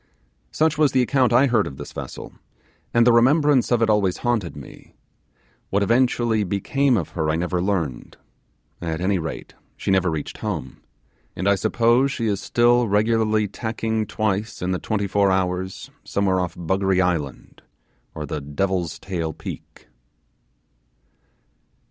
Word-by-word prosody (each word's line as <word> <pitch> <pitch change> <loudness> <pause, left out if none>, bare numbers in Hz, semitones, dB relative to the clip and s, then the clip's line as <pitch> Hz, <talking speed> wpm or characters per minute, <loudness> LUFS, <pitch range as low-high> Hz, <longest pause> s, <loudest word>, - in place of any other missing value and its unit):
Such 155 -1 +1
was 150 -3 +3
the 130 -1 +4
account 130 -1 +2
I 125 +4 +5
heard 115 -6 +2
of 65 - -8
this - - -8
vessel - - -8 0.6
and 115 0 +4
the 120 - +6
remembrance 135 +2 +4
of 120 -1 +3
it - - +3
always 100 -4 +1
haunted 115 -8 0
me; 70 -2 -13 0.7
what 100 +1 +1
eventually 120 -1 +2
became 120 +7 +1
of 85 - -3
her 80 - -2
I 80 - +1
never 90 +1 -1
learned; 85 -10 -2 0.6
at 80 -1 -3
any 95 +1 +1
rate: 80 -1 -6 0.2
he - - -2
never 95 -2 +3
reached 80 -3 -5
home, 65 0 -5 0.5
and 95 - -2
I 100 - +5
suppose 120 +6 +2
she 115 - -3
is 100 -3 -1
still 120 0 +3
regularly 110 0 +2
tacking 110 +1 -3
twice 105 0 -2
in 90 +1 -2
the 90 - -1
twenty 105 -2 -2
four 100 0 +2
hours 95 0 -2
somewhere 95 -2 0
off 90 -1 -3
Desolate 95 +2 0
Island, 85 -6 -2 0.5
or 75 - -4
the 75 +1 -4
Devil's 85 +3 -2
Tail 85 -3 -4
Peak. - - -10
100 Hz, 150 wpm, -22 LUFS, 90-115 Hz, 0.7 s, the